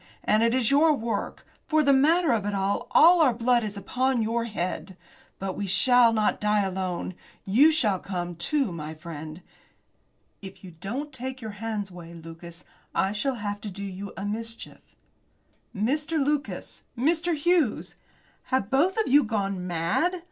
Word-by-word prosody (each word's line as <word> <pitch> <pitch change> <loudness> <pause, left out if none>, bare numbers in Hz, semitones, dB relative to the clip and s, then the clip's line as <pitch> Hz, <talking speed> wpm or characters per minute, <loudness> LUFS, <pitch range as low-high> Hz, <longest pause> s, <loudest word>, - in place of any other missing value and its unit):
And 215 +1 +3
it 230 +1 +3
is 255 -2 +2
your 300 +2 +5
work. 230 -3 -4 0.2
For 310 0 +3
the 280 -1 +4
matter 315 +4 +4
of 230 -2 +2
that, 205 0 -3
all 255 - +4
our 260 -7 +4
blood 240 0 +2
is 210 -1 -5
upon 255 +4 0
your 230 +1 -1
head. 185 -3 -4 0.4
But 190 -1 -4
we 200 - -3
shall 235 +5 +5
not 215 -2 0
die 210 0 +2
alone. 185 -1 -3 0.3
You 260 +11 +5
shall 215 -12 +2
come, 175 -2 -4
too, 240 - 0
my 155 -1 -6
friend." 155 +1 -9 1.0
"If 195 -1 -11
you 185 - -10
don't 235 - -6
take 260 +1 -6
your 220 -3 -6
hands 215 -4 -3
away, 170 -1 -11
Lucas, 170 +1 -11 0.3
I 190 - +1
shall 235 +6 -1
have 205 -2 -4
to 210 - -5
do 200 +1 -7
you 195 +1 -7
a 195 - -4
mischief." 225 +2 -6 0.9
"Mr. 290 +10 -1
Lucas! 295 0 -2 0.2
Mr. 330 +6 +1
Hughes! 310 -5 +1 0.5
Have 260 -3 +1
you 195 - -19
both 335 +9 +2
of 440 - +1
you 285 +3 +5
gone 200 -5 -2
mad? 175 - 0
220 Hz, 165 wpm, -26 LUFS, 190-270 Hz, 1.0 s, your